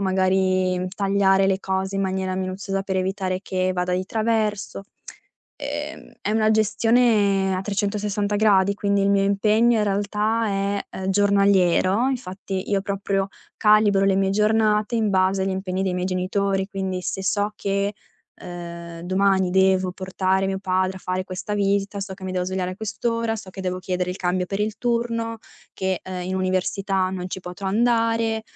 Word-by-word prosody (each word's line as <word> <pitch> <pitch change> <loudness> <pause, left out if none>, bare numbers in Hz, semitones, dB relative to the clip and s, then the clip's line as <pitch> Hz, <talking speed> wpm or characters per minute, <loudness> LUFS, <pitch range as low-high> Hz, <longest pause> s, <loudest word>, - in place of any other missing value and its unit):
magari 185 -1 +1
tagliare 195 -1 +3
le 190 0 +1
cose 190 0 -2
in 195 - 0
maniera 190 0 -1
minuziosa 190 +1 -3
per 190 -1 -2
evitare 185 0 -1
che 185 0 -1
vada 180 0 -1
di 185 +1 -1
traverso. 215 -3 -1 0.7
Ehm, - - -6
è 210 - -1
una 220 -1 +3
gestione 215 -3 +3
a - - -2
360° 205 0 +1
quindi 200 -1 +1
il 200 - +2
mio 200 0 +3
impegno 215 +4 +3
in 210 - +2
realtà 210 +3 0
è, 200 0 -1 0.2
uhm, 190 0 -3
giornaliero. 200 +2 +3
Infatti 195 -6 -4
io 195 -1 +1
proprio 195 -1 -1 0.3
calibro 210 -2 +4
le 195 -1 +3
mie 195 0 +2
giornate 215 +2 +2
in 220 -2 +1
base 190 0 +2
agli 195 - 0
impegni 190 0 -2
dei 185 - -1
miei 180 0 -1
genitori. 190 +1 0
Quindi, 190 -2 -3
se 190 - -3
so 205 +1 0
che, 200 +1 -1 0.5
ehm, 170 -1 -8
domani 190 0 +2
devo 190 -1 +3
portare 190 0 0
mio 190 0 -2
padre 185 0 0
a - - -21
fare 185 +1 -2
questa 190 +2 -4
visita, 200 0 0
so 195 -1 -5
che 190 - -11
mi 185 - -3
devo 180 -1 -1
svegliare 185 0 -2
a - - -10
quest'ora, 230 +1 -2
so 195 -3 -9
che 190 - -8
devo 185 0 -2
chiedere 180 0 -2
il 180 - -5
cambio 180 0 -1
per 195 +1 -3
il 210 0 -2
turno, 230 -1 -1 0.4
che, 190 -1 -1
ehm, 185 -1 -5
in 190 - -2
università 185 +1 0
non 185 -1 -4
ci - - -4
potrò 180 +2 -6
andare. 225 0 +1
195 Hz, 170 wpm, -23 LUFS, 185-205 Hz, 0.7 s, calibro